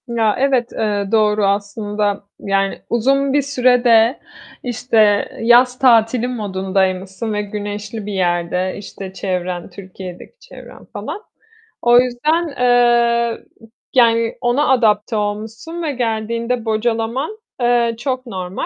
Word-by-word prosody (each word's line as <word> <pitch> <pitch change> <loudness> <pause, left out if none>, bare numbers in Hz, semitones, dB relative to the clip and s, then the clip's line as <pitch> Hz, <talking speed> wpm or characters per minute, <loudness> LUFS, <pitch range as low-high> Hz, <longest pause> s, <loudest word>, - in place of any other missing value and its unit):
Ya, 225 -3 +1
evet, 260 -3 +1
eee, 205 -2 -1
doğru 215 -2 +3
aslında, 205 +1 -1 0.2
yani, 195 0 -1
uzun 270 +4 +1
bir 290 - +3
süre 255 -3 +2
de, 230 +1 +4 0.4
işte, 245 -1 -2 0.4
yaz 245 +2 +4
tatili 235 -1 +4
modundaymışsın 190 -2 -2
ve 210 - -1
güneşli 205 +1 -6
bir 205 - -5
yerde, 180 0 -1
işte, 195 -1 -9
çevren, 180 -2 -3
Türkiye'deki 185 - -11
çevren 460 - -14
falan. 420 - -6 0.6
O 240 0 +6
yüzden, 300 +8 0
eee, 240 -1 +3 0.5
yani, 230 -2 +3
ona 250 +4 +1
adapte 225 -3 +2
olmuşsun 220 +10 -4
ve 310 - -1
geldiğinde 230 -1 -2
bocalaman, 230 - -1 0.2
eee, 240 -1 +2
çok 255 +2 -3
normal. 185 -5 -5
225 Hz, 115 wpm, -18 LUFS, 205-245 Hz, 0.6 s, O